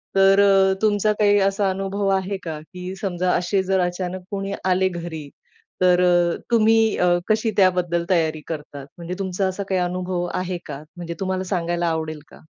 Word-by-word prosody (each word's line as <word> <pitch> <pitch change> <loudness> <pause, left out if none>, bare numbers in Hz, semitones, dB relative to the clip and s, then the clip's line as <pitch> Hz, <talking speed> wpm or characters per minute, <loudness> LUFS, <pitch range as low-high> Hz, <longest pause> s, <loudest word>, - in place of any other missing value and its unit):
तर 195 +1 +5
अ, 195 -1 +5
तुमचा 210 0 +2
काही 205 -1 +4
असा 195 0 0
अनुभव 195 +1 -2
आहे 190 +1 -2
का? 160 -3 -5
की 180 +3 -8
समजा 185 -2 0
असे 180 +2 +1
जर 190 0 +1
अचानक 180 +1 -3
कोणी 200 0 -3
आले, 185 0 +2
घरीतर 175 +2 -2
अ, 175 -1 +3
तुम्ही 225 -1 +4 0.2
अ, 175 -1 +3
कशी 220 +1 +2
त्याबद्दल 180 -3 +2
तयारी 160 -4 +1
करतात? 145 -3 -7
म्हणजे 170 +1 -6
तुमचा 190 0 -1
असा 190 +2 -3
काही 190 - +1
अनुभव 180 0 -2
आहे 185 0 -2
का? 140 +2 -7
म्हणजे 170 -1 -5
तुम्हाला 190 -1 -2
सांगायला 175 0 -1
आवडेल 160 -2 -2
का? - - -15
185 Hz, 170 wpm, -22 LUFS, 175-195 Hz, 0.2 s, तर